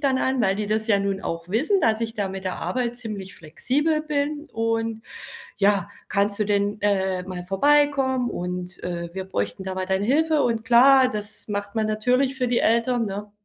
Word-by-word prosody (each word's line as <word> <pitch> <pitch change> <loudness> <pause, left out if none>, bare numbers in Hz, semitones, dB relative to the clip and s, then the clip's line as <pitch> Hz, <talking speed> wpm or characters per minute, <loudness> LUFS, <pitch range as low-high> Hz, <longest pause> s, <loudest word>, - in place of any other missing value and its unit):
dann 275 -2 +2
an, 260 0 0
weil 195 -3 +2
die 210 0 -2
das 220 +1 0
ja 205 -3 +3
nun 195 -1 -1
auch 165 -1 -5
wissen, 305 - +1
dass 220 -3 +2
ich 225 -1 -3
da 205 -3 -2
mit 190 0 -7
der 185 - -2
Arbeit 245 -2 -2
ziemlich 210 -6 -6
flexibel 280 - -1
bin. 300 0 -2
Und 225 0 -1 0.6
ja: 200 -1 +2 0.2
„Kannst 200 0 +1
du - - +3
denn, 205 0 0
äh, 190 -2 +1
mal 180 -1 -6
vorbeikommen, 265 +4 +2
und, 180 0 -5
äh, 170 -1 -4
wir 190 0 -5
bräuchten 100 - -3
da 190 0 -4
mal 185 0 -2
deine 190 +1 0
Hilfe", 310 +4 +2
und 230 -2 0
klar, 255 +2 +6
das 210 -3 -6
macht 205 0 -4
man 220 -1 +1
natürlich 250 +5 +1
für 255 -2 -1
die 240 0 +1
Eltern, 235 +1 +2
ne? 205 +1 -6
215 Hz, 195 wpm, -24 LUFS, 195-255 Hz, 0.6 s, klar